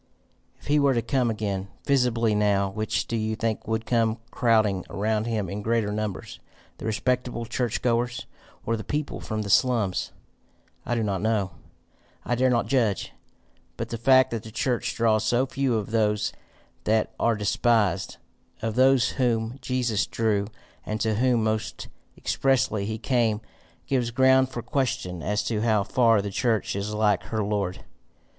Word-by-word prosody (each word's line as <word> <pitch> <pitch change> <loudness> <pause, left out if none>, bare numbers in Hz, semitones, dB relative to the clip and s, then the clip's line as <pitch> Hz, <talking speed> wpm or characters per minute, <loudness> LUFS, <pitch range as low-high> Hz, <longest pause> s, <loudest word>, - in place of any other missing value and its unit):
"If - - -19
he 150 +1 +3
were 140 -2 +3
to 115 - 0
come 125 0 +1
again, 100 -3 -2 0.2
visibly, 120 -5 +2
now, 100 -2 +2
which 110 +2 -1
do 115 - -3
you 110 0 -1
think 110 -1 -2
would 110 0 -1
come 115 -2 +1
crowding 110 -6 +2
around 110 +2 -1
him 110 -4 -1
in 100 +3 -5
greater 110 -1 0
numbers 105 -2 -4 0.4
the - - -5
respectable 120 +1 -1
church 120 0 -2
goers, 120 0 0 0.4
or 115 - +1
the 110 - -5
people 150 0 -3
from 110 -1 -3
the 100 - -6
slums? 115 -6 +2 0.8
I 120 - 0
do 115 - 0
not 100 -3 -1
know. 105 -4 0 0.7
I 120 - 0
dare 130 +2 +3
not 120 -2 +2
judge. 115 -8 0 0.6
But 115 0 -4
the 115 - -3
fact 130 +1 +5
that 115 -2 -2
the 110 - -10
church 125 +2 -1
draws 110 -2 +2
so 120 +4 +2
few 135 -2 0
of 105 0 -4
those 105 -1 +1 0.5
that 110 0 +1
are 115 -1 +2
despised, 105 -3 +1 0.5
of 110 -1 -1
those 130 +1 +4
whom 120 -1 -1
Jesus 125 -5 0
drew 105 -3 0 0.4
and 110 0 -3
to 110 -1 +1
whom 120 +1 +2
most 110 0 -2 0.3
expressly 130 -7 +1
he 110 0 -3
came, 115 -2 +1 0.5
gives 125 -3 0
ground 130 +2 +4
for 120 -3 -6
question 120 - -2
as 105 +5 -1
to 110 -2 -1
how 110 -3 +2
far 115 -1 +3
the 100 - -4
church 110 -1 0
is 100 +1 -3
like 105 -3 +2
her 110 -1 -2
Lord. 100 -3 -2
110 Hz, 165 wpm, -25 LUFS, 105-120 Hz, 0.8 s, fact